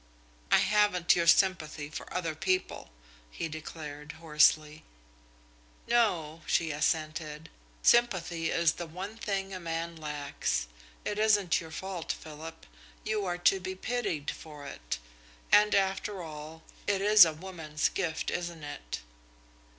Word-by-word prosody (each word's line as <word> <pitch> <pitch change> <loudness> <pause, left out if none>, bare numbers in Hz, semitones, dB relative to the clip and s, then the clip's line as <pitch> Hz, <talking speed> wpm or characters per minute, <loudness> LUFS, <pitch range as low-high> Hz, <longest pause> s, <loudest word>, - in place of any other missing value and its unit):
"I - - +8
haven't 205 -5 +3
your 170 -1 +1
sympathy 165 -5 +3
for 150 - -8
other 170 -3 -2
people," 185 - -1 0.4
he 110 - -4
declared 150 -1 -7
hoarsely. 155 -1 +3 1.0
"No," 175 -10 +1
she 165 -2 +2
assented, 155 +1 -2 0.3
"sympathy 175 -9 +3
is 165 0 +3
the 170 0 -6
one 190 +6 -6
thing 195 -3 -3
a 185 - -4
man 165 0 -3
lacks. 150 - -2 0.4
It 210 - -2
isn't 210 -5 +3
your 165 - -9
fault, 185 +1 -4
Philip. 155 - -10 0.4
You 215 -2 -1
are 175 -1 -1
to 180 +2 +4
be 185 0 -5
pitied 185 -9 -2
for 150 -2 -10
it. - - -5 0.5
And, 210 0 +6
after 195 0 0
all, 155 0 -9 0.2
it 200 -1 +2
is 210 0 +9
a 165 -2 +3
woman's 160 -3 -2
gift, 165 -4 -2
isn't 170 -3 -4
it?" - - -6
165 Hz, 130 wpm, -30 LUFS, 155-190 Hz, 1.0 s, is